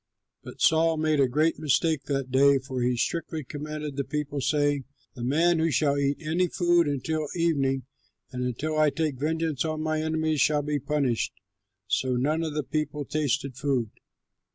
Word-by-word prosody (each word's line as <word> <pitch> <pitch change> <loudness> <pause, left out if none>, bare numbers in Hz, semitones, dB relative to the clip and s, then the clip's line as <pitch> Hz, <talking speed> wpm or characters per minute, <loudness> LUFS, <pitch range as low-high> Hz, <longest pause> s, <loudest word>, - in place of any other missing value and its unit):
But - - -11
Saul 160 0 +4
made 155 -1 +1
a 135 - +5
great 155 +6 +1
mistake 155 -1 +1
that 135 -3 -2
day, 140 +1 +5
for 130 -1 -4
he 125 0 +1
strictly 160 +3 -2
commanded 150 +1 -6
the 140 - 0
people, 145 0 -3
saying, 145 -1 +1 0.3
"The 125 - -7
man 160 +6 +3
who 165 +1 +2
shall 145 0 +2
eat 140 0 +1
any 165 +4 +1
food 175 -2 +2
until 150 +2 -2
evening 140 -6 +1 0.5
and 125 -1 -3
until 150 +6 -2
I 155 -1 +5
take 150 -4 -2
vengeance 160 -1 -1
on 155 -1 -2
my 155 0 0
enemies 160 -2 0
shall 150 0 +3
be 150 0 -1
punished." 140 -4 0 0.5
So 125 +5 0
none 150 +6 +1
of 155 -2 -3
the 150 - 0
people 150 +2 -3
tasted 140 -3 -1
food. 130 -5 -1
150 Hz, 175 wpm, -27 LUFS, 135-155 Hz, 0.5 s, a